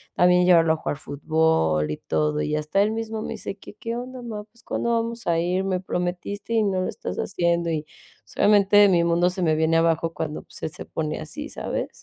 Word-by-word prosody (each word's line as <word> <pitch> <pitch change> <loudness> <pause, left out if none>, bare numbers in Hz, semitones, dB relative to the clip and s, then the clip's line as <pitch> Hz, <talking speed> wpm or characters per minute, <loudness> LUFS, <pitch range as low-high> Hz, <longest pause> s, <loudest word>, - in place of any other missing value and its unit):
también 180 0 +5
llevarlo 165 -3 +5
a - - -2
jugar 155 - -3
fútbol 140 - +1
y 75 - -3
todo. 150 0 -1
Y 150 - -1
hasta 155 +6 +1
él 210 +2 +2
mismo 220 0 -3
me - - -4
dice: 195 - -6
"¿Que 200 - -12
qué 230 +2 -4
onda, 250 +1 -7
ma? 220 -3 -6
Pues, 225 +3 -21
¿cuándo 235 - -1
vamos 230 -2 -2
a 170 -1 +2
ir? 180 +3 0
Me 185 -1 0
prometiste 185 +4 -3
y 225 -1 +3
no 195 -2 0
lo 185 - -1
estás - - -6
haciendo". 170 -2 0
Y, 155 -2 -1
o - - -24 0.4
sea, - - -3
obviamente, 205 0 +6
mi 175 -2 +4
mundo 170 +1 +3
se 185 +1 -5
me 160 -2 +3
viene 160 +1 +2
abajo 165 0 +1
cuando, 155 -2 -4
pues, - - -11
se - - -8
pone 155 -1 -3
así, 295 - -7
¿sabes? - - -3
180 Hz, 225 wpm, -24 LUFS, 160-210 Hz, 0.4 s, obviamente